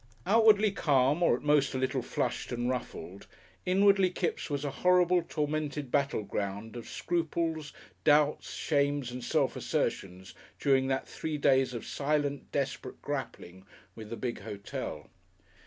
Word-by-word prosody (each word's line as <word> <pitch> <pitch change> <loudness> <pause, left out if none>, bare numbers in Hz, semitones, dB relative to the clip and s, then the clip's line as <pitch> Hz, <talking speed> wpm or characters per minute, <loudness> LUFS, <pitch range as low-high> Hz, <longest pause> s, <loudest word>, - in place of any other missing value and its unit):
Outwardly 215 0 +5
calm, 145 -3 +2
or 170 - +4
at - - -8
most 145 -2 +3
a - - +1
little 130 0 0
flushed - - -2
and 120 0 -1
ruffled, 115 -6 -5 0.4
inwardly 195 0 +5
Kipps 175 -2 -2
was 145 0 -2
a 140 - -2
horrible, 180 0 +4
tormented 150 -4 -3
battleground 105 -6 -2
of 120 - -8
scruples, 165 -2 -2 0.3
doubts, 150 0 +3
shames 140 -3 0
and 125 0 -6
self - - +1
assertions 95 0 -2 0.3
during 135 -2 +3
that 135 0 -1
three 155 -1 -4
days 135 -3 +3
of 115 - -5
silent, 145 -1 -1
desperate 130 -2 -3
grappling 125 -10 -5 0.3
with 110 -2 -9
the 115 - -5
big 120 -2 -3
hotel. 100 0 -6
140 Hz, 140 wpm, -30 LUFS, 125-160 Hz, 0.4 s, Outwardly